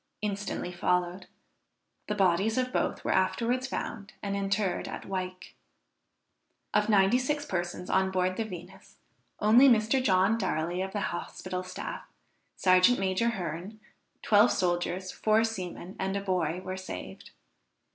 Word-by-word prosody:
instantly 200 -3 -3
followed. 180 +1 -1 0.8
The 210 - -1
bodies 195 +3 +2
of 255 0 0
both - - -1
were - - +1
afterwards 250 +2 +1
found 215 -5 -5
and 200 -1 -2
interred 195 -2 -1
at - - -7
Wyke. 185 -1 -5 1.2
Of 210 +1 +2
ninety 205 +3 +5
six 295 +3 -1
persons 175 -2 -3
on 190 0 +2
board 185 0 0
the 225 - -1
Venus, 185 -2 -10 0.4
only 235 +6 +7
Mr. 230 +3 +3
John 195 +2 +3
Darley 175 -2 -1
of 190 0 -3
the 205 - -2
hospital 180 +1 -5
staff, 185 - -6 0.5
serjeant 185 +6 +5
major 195 +4 +1
Hearne, 185 0 -5 0.4
twelve 210 +2 +5
soldiers, 180 +1 -1
four 215 +1 +2
seamen 185 -4 -5
and 195 +1 -1
a - - -2
boy 180 -3 -1
were 185 0 -5
saved. 185 - -8
190 Hz, 135 wpm, -29 LUFS, 185-215 Hz, 1.2 s, only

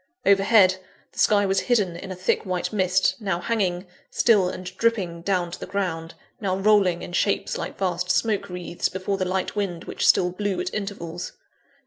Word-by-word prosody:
Overhead, 195 -1 +5 0.3
the - - -12
sky 205 -1 +4
was 195 0 +2
hidden 205 -8 +1
in 190 +2 -8
a - - -4
thick 185 +1 0
white 185 0 -3
mist, 185 -2 +2
now 195 -5 -1
hanging, 185 -4 -1 0.2
still 205 -6 +3
and 185 - -7
dripping, 195 -8 0
down 180 -1 0
to - - -7
the - - -7
ground; 180 -4 -3 0.2
now 190 -3 -1
rolling 195 -3 +3
in 175 - -8
shapes 200 +2 0
like - - -5
vast 180 -2 -1
smoke 205 0 +1
wreaths 180 -1 -3
before 190 +1 -3
the 185 - -1
light 185 +2 -2
wind 195 -5 -2
which - - -2
still 180 0 +4
blew 195 0 -2
at 180 +1 -3
intervals. 195 -5 -5
190 Hz, 180 wpm, -24 LUFS, 180-200 Hz, 0.3 s, Overhead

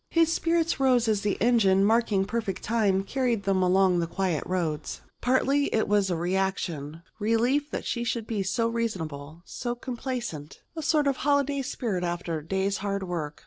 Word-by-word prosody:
His 330 -1 +3
spirits 330 -1 +1
rose 250 -3 +3
as 215 -2 +1
the 205 -2 -1
engine, 200 -4 +4
marking 215 -3 +2
perfect 205 -3 -3
time, 205 -4 +1
carried 240 -1 -1
them 190 -1 +1
along 185 0 +3
the 170 - -1
quiet 180 -2 -1
roads. 165 -5 -2 0.2
Partly 270 +3 +2
it 220 - +1
was 205 -2 +2
reaction 170 -3 -2 0.2
relief 240 +7 +1
that - - -4
she 235 - -2
should 235 -1 -2
be 220 -3 -2
so 195 +5 0
reasonable, 165 -9 -4
so 240 0 -4
complaisant 240 - -5
and 320 - -4
a - - -2
sort 300 -2 +3
of 275 -2 +1
holiday 285 0 +1
spirit 235 -9 -3
after 170 -1 -2
the 150 - -17
day's 195 +2 0
hard 200 -1 -2
work. 165 -5 -4
205 Hz, 175 wpm, -27 LUFS, 185-245 Hz, 0.2 s, engine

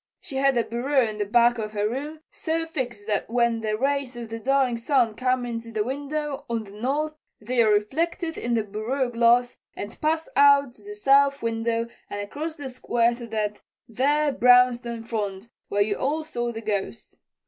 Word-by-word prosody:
She 270 - -7
had 270 -1 +3
a 235 - +3
bureau 255 +3 +1
in 215 -1 -6
the 205 - 0
back 240 +2 +4
of 215 -1 -4
her 205 0 0
room 295 +7 -5
so 325 0 -2
fixed 245 -9 -5
that 210 -1 -1
when 235 -1 +1
the 215 -1 -1
rays 275 0 -1
of 235 -2 -7
the 225 0 -5
dying 265 0 +2
sun 235 -1 +2
come 255 +1 0
into 230 -1 -5
the 215 -1 0
window 285 +3 -3
on 230 -1 -1
the 200 - -13
north 275 +9 -2 0.3
they 240 +3 +1
are 220 - +4
reflected 325 - 0
in 240 0 -1
the 225 - +1
bureau 230 +5 -2
glass 240 +1 +3 0.2
and 205 - -8
pass 320 +1 0
out 280 -3 +5
of - - -19
the 415 0 -7
south 280 - +3
window 230 0 0 0.2
and 205 - -5
across 295 +11 -5
the 290 -4 -7
square 240 -2 +1
to 235 0 -8
that 210 -2 -3 0.3
there 290 +6 +1
brownstone 245 -2 +4
front 210 -2 -4 0.2
where 205 0 +2
you 205 0 -1
all 305 +4 -1
saw 240 -6 -3
the 225 -1 -6
Ghost. 210 -3 -4
240 Hz, 190 wpm, -25 LUFS, 225-280 Hz, 0.3 s, out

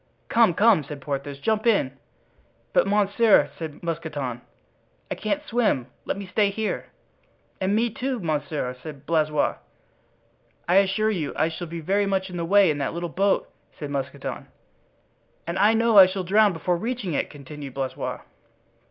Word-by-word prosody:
"Come, 225 -7 +4
come!" 210 -5 +5
said 145 +1 -8
Porthos; 140 0 -4
"jump 220 +9 0
in." 135 - +2 0.8
"But, - - +4
monsieur," 205 +2 +4
said 160 -2 -7
Mousqueton, 150 -7 -4 0.7
"I - - +2
can't 290 +8 -2
swim; 225 - +1 0.2
let - - -2
me 200 - -6
stay 205 +2 +2
here." 215 +2 -3 0.7
"And 190 +2 +1
me, 230 +1 +1
too, 255 +2 -3
monsieur," 150 -6 -2
said 150 -2 -9
Blaisois. 155 -2 +1 1.1
"I 180 +2 +4
assure 200 +3 +3
you, 160 -8 -2
I 155 - +1
shall 170 +2 -6
be 165 +1 -6
very 200 +5 +1
much 190 -1 -1
in 180 - -5
the 170 - -2
way 195 -1 +5
in 145 - -3
that 140 - -2
little 170 0 -3
boat," 195 +3 +1 0.3
said 145 -2 -6
Mousqueton. 140 0 -4 1.0
"And 170 +2 -3
I 215 +2 +5
know 230 -2 +5
I 190 - +10
shall 185 0 -3
drown 205 +3 +4
before 175 +1 -1
reaching 225 -3 -3
it," - - -1
continued 145 -1 -9
Blaisois. 135 -1 -3
175 Hz, 160 wpm, -24 LUFS, 150-205 Hz, 1.1 s, I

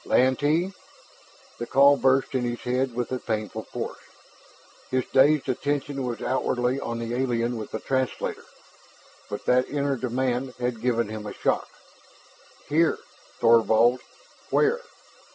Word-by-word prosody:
"Lantee!" 145 +8 +2 0.9
The 120 - -4
call 140 +2 +6
burst 135 0 +2
in 130 - +1
his 120 0 -3
head 125 0 -1
with 125 0 -2
a 130 - -1
painful 110 -3 -3
force. - - -5 0.9
His 130 -1 0
dazed 140 +2 +5
attention 140 +1 -2
was 120 -3 -4
outwardly 125 0 0
on 115 -3 -4
the 115 0 -4
alien 120 -1 0
with 110 -2 -6
the 110 - -4
translator, 130 +1 -2 0.9
but 105 - -6
that 125 +1 +3
inner 140 -1 0
demand 125 +1 -2
had 125 -2 -2
given 115 -2 +1
him 110 -1 -6
a - - -6
shock. - - 0 1.0
"Here! 160 +3 +3 0.4
Thorvald? 115 +1 +5 0.5
Where?" 450 +2 +3
125 Hz, 135 wpm, -25 LUFS, 120-135 Hz, 1.0 s, call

